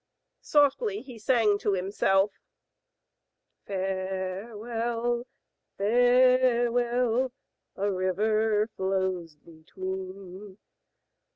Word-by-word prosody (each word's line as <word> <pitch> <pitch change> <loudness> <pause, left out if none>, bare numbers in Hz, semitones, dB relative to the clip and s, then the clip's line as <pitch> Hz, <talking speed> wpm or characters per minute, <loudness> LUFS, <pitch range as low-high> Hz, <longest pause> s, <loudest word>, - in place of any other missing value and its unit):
Softly 310 - +2
he 250 -4 -11
sang 215 -3 +2
to 205 - 0
himself: 195 +1 +1 1.4
Farewell, 210 +6 -3 0.5
farewell, 245 +1 +3 0.4
A 200 +1 -1
river 210 +3 +1
flows 190 -4 -2
between. 185 +4 -8
210 Hz, 60 wpm, -27 LUFS, 190-240 Hz, 1.4 s, farewell